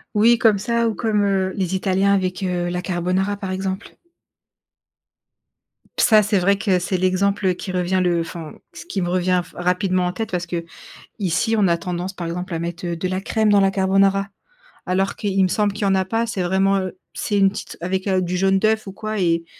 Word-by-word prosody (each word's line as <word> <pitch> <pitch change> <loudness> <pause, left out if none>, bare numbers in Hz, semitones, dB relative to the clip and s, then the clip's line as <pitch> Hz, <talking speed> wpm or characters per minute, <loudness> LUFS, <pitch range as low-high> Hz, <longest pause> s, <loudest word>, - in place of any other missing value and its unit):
Oui, 230 +3 +5
comme 220 -3 +4
ça, 235 +3 0
ou 215 - -4
comme, 215 -3 +1
heu, 190 -1 0
les 190 -2 -1
italiens 195 +1 +2
avec, 185 -2 -1
heu, 175 -1 -1
la 180 0 -2
carbonara, 185 +2 -1
par 195 -2 -5
exemple. 190 0 -4 2.0
Ça, 215 -2 +6
c'est 205 -1 +1
vrai 195 +2 +3
que 190 -4 +2
c'est 180 +1 -2
l'exemple 185 +1 +1
qui 185 - -6
revient 185 +1 0
le 175 -1 +2
enfin, 165 -1 -7 0.2
ce - - -10
qui 200 - -3
me 175 - -1
revient 180 0 +1
f - - -18
rapidement 180 +1 +1
en 180 - 0
tête 220 +3 -4
parce 180 -1 -2 0.5
qu'ici, 200 +3 -2
on 200 -3 +4
a 170 - +3
tendance, 180 +2 -4
par 175 -3 -5
exemple, 180 +1 -4
à - - -2
mettre, 170 +1 -5
heu, 170 -1 -2
de 185 +3 -2
la 185 +1 -2
crème 215 +2 +1
dans 205 -1 +5
la 195 0 +4
carbonara 195 +1 +2 0.6
alors 190 +1 0
qu'il 195 -2 0
me - - +4
semble 205 +2 +1
qu'il 205 +1 -5
y - - +2
en 195 - +3
a 190 - +2
pas. 225 +5 -1
C'est 195 -5 -2
vraiment, 190 +2 +2
heu, 185 -1 -5
c'est 205 - -1
une 195 -1 +5
petite 195 - -8
avec, 185 +2 -2
heu, 185 -1 +2
du 180 0 -2
jaune 195 +1 +2
d'œuf 220 +1 +1
ou 195 - -7
quoi 215 +2 -5
et 170 -2 +1
190 Hz, 215 wpm, -21 LUFS, 180-200 Hz, 2.0 s, Ça